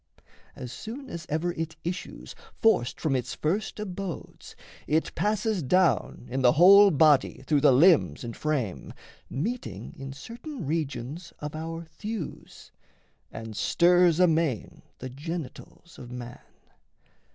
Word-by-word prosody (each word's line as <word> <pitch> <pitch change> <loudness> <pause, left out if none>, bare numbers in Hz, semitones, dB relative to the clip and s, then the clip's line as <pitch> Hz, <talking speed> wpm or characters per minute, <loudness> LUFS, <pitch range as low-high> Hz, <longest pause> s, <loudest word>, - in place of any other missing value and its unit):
As 125 - -7
soon 240 - -8
as 170 0 -7
ever 160 +3 0
it 160 -1 -5
issues, 175 +2 -6 0.2
Forced 135 - +2
from 150 -4 0
its 125 - -3
first 200 +8 -2
abodes, 195 -3 -7 0.3
it 160 +2 0
passes 210 -1 0
down 145 - +1
In 135 +1 -1
the 125 -1 +5
whole 200 +5 +8
body 145 -5 +3
through 145 -1 +2
the 145 - +6
limbs 130 - +4
and 115 -1 -6
frame, 140 -11 -3 0.3
Meeting 135 - -4
in 135 0 -7
certain 230 - -8
regions 150 +1 -4
of 150 0 -6
our 165 +1 -5
thews, 210 +2 -8 0.6
And 110 -1 -8
stirs 175 - +4
amain 165 - +1 0.2
the 130 - -7
genitals 165 +3 -8
of 120 - -10
man. 125 -1 -8
160 Hz, 130 wpm, -27 LUFS, 130-180 Hz, 0.6 s, whole